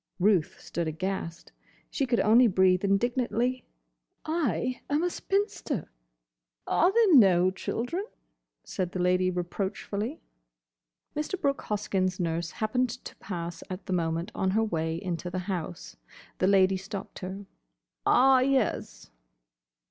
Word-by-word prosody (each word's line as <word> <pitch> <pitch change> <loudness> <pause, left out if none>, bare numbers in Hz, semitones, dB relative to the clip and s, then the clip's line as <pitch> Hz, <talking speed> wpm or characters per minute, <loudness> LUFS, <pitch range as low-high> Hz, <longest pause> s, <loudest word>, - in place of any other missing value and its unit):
Ruth 185 -4 +2
stood 170 0 -3
aghast. 170 +1 -4 0.4
She 275 - 0
could 240 -2 +2
only 235 +4 +6
breathe 185 -2 +3
indignantly, 240 +4 0 0.6
"I 255 - -1
am 295 +3 +1
a 355 - +1
spinster." 390 - -2 0.7
"Are 350 +3 +3
there 440 -4 +4
no 185 - +6
children?" 245 - -3 0.6
said 180 -2 -3
the 185 - -3
Lady 180 +1 +2
reproachfully. 200 - -3 1.0
Mr. 305 +5 -2
Brooke 280 -5 0
Hoskyn's 190 -3 -1
nurse 165 -1 -1
happened 250 +5 0
to 240 +2 -8
pass 170 -3 -6
at 185 +1 -6
the 185 - -2
moment 165 +2 -1
on 190 - 0
her 225 - +3
way 165 -5 -1
into 180 -2 -4
the 180 - -4
house. 175 - -5 0.4
The 185 - +3
Lady 190 -1 +4
stopped 195 +1 -7
her. 190 +2 -6 0.6
"Ah, 265 - +5
yes." 260 - 0
195 Hz, 125 wpm, -28 LUFS, 180-250 Hz, 1.0 s, only